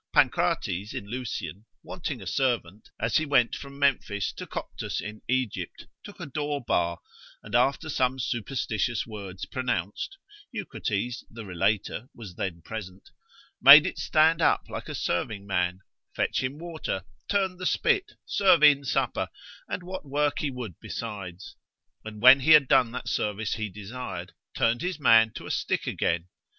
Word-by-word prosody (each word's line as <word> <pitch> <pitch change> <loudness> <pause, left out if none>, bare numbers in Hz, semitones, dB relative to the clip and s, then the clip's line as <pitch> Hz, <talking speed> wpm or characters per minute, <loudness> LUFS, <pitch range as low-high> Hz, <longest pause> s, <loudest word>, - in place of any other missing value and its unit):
Pancrates 95 +4 +1
in - - -4
Lucian, 115 -4 -5 0.2
wanting 140 - -5
a - - -11
servant 110 -4 -1
as 115 - +2
he 155 - +1
went 125 -5 +3
from 140 0 -9
Memphis 120 -8 +1
to - - -8
Coptus - - -5
in 105 +2 -7
Egypt, 130 -3 -2 0.2
took 205 - -12
a 170 - -5
door 145 0 -2
bar, 85 -8 0 0.4
and - - -11
after 135 +6 +2
some 130 -3 +1
superstitious 120 -2 -1
words 100 -4 -7
pronounced 125 - -3 0.3
(Eucrates 125 - -3
the 115 -1 -9
relator 105 +6 -1
was 105 -6 -9
then 85 -2 -4
present) 95 -2 -8 0.5
made 140 +3 +11
it - - -3
stand 160 +1 +3
up - - +4
like - - -6
a - - -4
serving 100 +3 -2
man, 90 -1 -1 0.3
fetch - - 0
him 130 +3 -3
water, 160 - -4 0.2
turn 190 -3 +1
the 185 0 -2
spit, 400 +2 +1
serve 185 -5 +4
in 145 -2 +7
supper, 135 - 0 0.4
and 180 - -4
what 185 +1 -6
work 145 +1 0
he 150 - -1
would 125 - -7
besides; 100 -5 -7 0.5
and 110 0 -9
when 130 +2 +10
he 155 +4 +6
had 150 -3 +7
done 130 -4 +4
that 125 - -6
service 105 0 -1
he 110 0 -3
desired, 105 +6 -7 0.2
turned 115 +1 +2
his 180 -3 -2
man 115 -5 +6
to - - -9
a - - -4
stick - - -1
again. 85 +1 -1
120 Hz, 160 wpm, -27 LUFS, 100-145 Hz, 0.5 s, made